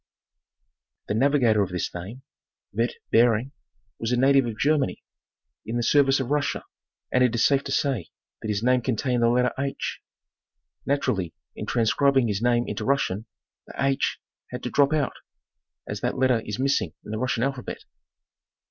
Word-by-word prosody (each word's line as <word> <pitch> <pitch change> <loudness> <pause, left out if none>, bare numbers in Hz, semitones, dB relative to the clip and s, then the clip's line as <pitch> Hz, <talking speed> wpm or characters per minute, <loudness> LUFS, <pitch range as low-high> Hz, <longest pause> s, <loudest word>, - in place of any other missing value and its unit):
'The - - +1
navi 140 +6 +3
gator 110 -3 +4
of 95 - 0
this 90 -1 -3
name, 100 +9 -8 0.5
Veit 115 +4 0 0.2
Behring, 115 +2 +3 0.5
was 115 +1 -2
a 125 - +2
native 135 0 +4
of 110 -2 -5
Germany, 145 +1 +1 0.6
in 115 +3 -3
the 120 - 0
service 140 +1 +4
of 135 0 -3
Russia, 145 -1 0 0.5
and 125 - +4
it 120 -2 +2
is 115 - +3
safe 140 -1 +3
to - - -4
say 130 - 0 0.3
that - - -5
his 105 0 -1
name 125 0 +3
con 125 0 0
tained 125 +2 0
the 115 0 +4
letter 125 +1 +2
4. 135 0 -1 1.1
Naturally, 95 - 0 0.2
in - - -6
transcribing 130 +3 +3
his 105 -1 -1
name 120 0 +3
into - - -4
Russian, 115 -7 0 0.4
the - - -11
4 140 0 +2 0.6
had 125 0 -7
to 125 - -3
drop 140 -1 +4
out, 150 -4 +1 0.7
as - - -5
that - - -1
letter 130 -3 +3
is 105 0 -3
missing 130 - 0
in - - -7
the 110 - -3
Russian 125 -2 0
alphabet. 135 -2 -3
125 Hz, 175 wpm, -25 LUFS, 110-135 Hz, 1.1 s, gator